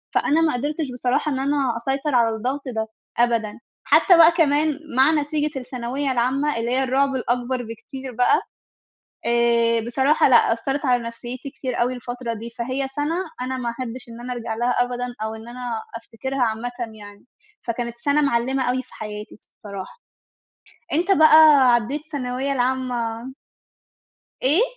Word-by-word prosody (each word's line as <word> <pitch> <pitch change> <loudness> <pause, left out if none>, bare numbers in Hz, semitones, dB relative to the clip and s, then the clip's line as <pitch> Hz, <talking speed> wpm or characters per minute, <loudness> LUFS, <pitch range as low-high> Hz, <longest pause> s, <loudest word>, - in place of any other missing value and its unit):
فأنا 310 +3 +3
ما 315 -3 +2
قدِرتِش 290 +2 -2
بصراحة 250 +5 0
إن 265 - -1
أنا 275 -4 0
أسيطَر 270 +4 -1
على 230 -2 +3
الضغط 255 +6 -2
ده 220 -3 -2 0.3
أبدًا. 230 -3 +1 0.2
حتى 360 -4 +5
بقى 330 0 +8
كمان 305 -3 +2 0.2
مع 265 +4 +6
نتيجة 300 -1 -1
الثانوية 255 +2 -3
العامة، 260 +3 0
اللي 230 +1 -2
هي 265 +1 +2
الرعب 270 +1 +1
الأكبر 245 0 -1
بكتير 240 +4 -8
بقى. 250 - +3 0.8
آآ، 235 -1 +3
بصراحة 270 +5 +3
لأ، 235 -2 +5
أثَّرت 270 +5 -3
على 245 -2 +2
نفسيَّتي 240 +3 -7
كتير 255 -3 -4
أوي 245 +2 +1
الفترة 245 -1 -5
دي. 230 +1 -7
فهي 255 +4 -3
سنة 295 +3 -1 0.3
أنا 260 +1 -2
ما 245 -2 -2
أحِبش 245 0 -6
إن 230 +1 -10
أنا 250 +1 -4
أرجع 230 -2 -4
لها 240 +2 0
أبدًا، 245 0 -4 0.2
أو 220 0 -3
إن 220 +1 -11
أنا 240 -2 -5
أفتكرها 255 +4 -5
عامةً 230 +1 -2 0.3
يعني. 205 -1 -13 0.4
فكانت 235 0 -4
سنة 285 +4 +1
معلِّمة 265 -1 +1
أوي 255 +1 0
في - - -21
حياتي 210 -1 -8 0.2
بصراحة. 200 - -9 0.9
أنتَ 345 +6 +2
بقى، 310 -5 +7
عدِّيت 240 +5 0
الثانوية 275 -2 -3
العامة 250 -2 -2 1.1
إيه؟ 295 - +4
250 Hz, 155 wpm, -22 LUFS, 235-275 Hz, 1.1 s, بقى